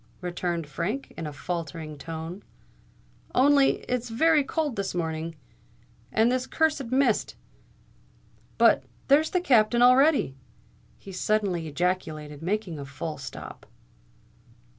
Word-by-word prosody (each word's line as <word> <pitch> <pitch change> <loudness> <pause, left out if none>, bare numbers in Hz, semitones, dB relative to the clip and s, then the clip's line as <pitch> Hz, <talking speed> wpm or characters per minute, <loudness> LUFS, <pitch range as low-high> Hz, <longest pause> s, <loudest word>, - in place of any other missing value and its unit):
returned 175 -2 -3
Frank, 175 - -4
in 165 - -5
a - - -5
faltering 160 0 -5
tone. 165 +5 -7 0.9
"Only 280 +1 +4
it's 245 -1 -2
very 300 +6 +4
cold 295 -2 -2
this 195 -2 -3
morning—and 165 +7 -3
this 255 0 -1
cursed 310 -4 +1
mist——But 255 -3 -1 0.3
there's 300 +3 +5
the 360 - 0
Captain 240 -6 +4
already!" 260 - +5 0.6
he 195 - -11
suddenly 190 -3 0
ejaculated, 155 -3 -2
making 185 -2 -2
a 140 - -6
full 145 +2 -6
stop. 135 - -9
190 Hz, 105 wpm, -26 LUFS, 160-255 Hz, 0.9 s, there's